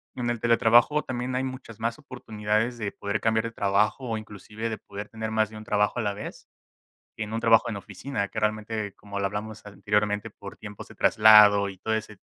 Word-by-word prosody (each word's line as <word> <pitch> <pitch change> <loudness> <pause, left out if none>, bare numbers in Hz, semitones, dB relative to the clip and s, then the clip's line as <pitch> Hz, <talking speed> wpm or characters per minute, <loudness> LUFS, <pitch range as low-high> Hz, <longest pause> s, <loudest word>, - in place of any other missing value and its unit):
en 120 -1 -2
el 120 -2 -2
teletrabajo 120 +5 +4
también 125 0 -4
hay 130 - 0
muchas 130 -4 -8
más 115 +4 -2
oportunidades 115 -4 -2
de 105 -3 -3
poder 100 +1 -3
cambiar 110 0 +1
de 115 - -4
trabajo 105 +5 +1
o, 110 - -1
inclusive, 110 +1 -7
de 110 - -4
poder 100 +1 -8
tener 110 0 -5
más 110 -1 +1
de 110 - -13
un 110 - -9
trabajo 105 +2 +1
a - - +1
la 105 -2 -1
vez, 105 - -9 0.7
que 110 - -3
en 105 - -7
un 115 - -1
trabajo 115 -1 +4
en 110 - -3
oficina 100 +3 -4
que, 110 - -4
realmente, 110 -1 -2
como 100 -1 -7
lo 100 - +1
hablamos 105 +2 -6
anteriormente, 105 +1 -1
por 100 -1 -11
tiempos 105 -1 -10
de - - -14
traslado 105 -2 +6
y 95 - -8
todo 110 - -3
ese 110 -1 -4
110 Hz, 215 wpm, -26 LUFS, 105-115 Hz, 0.7 s, traslado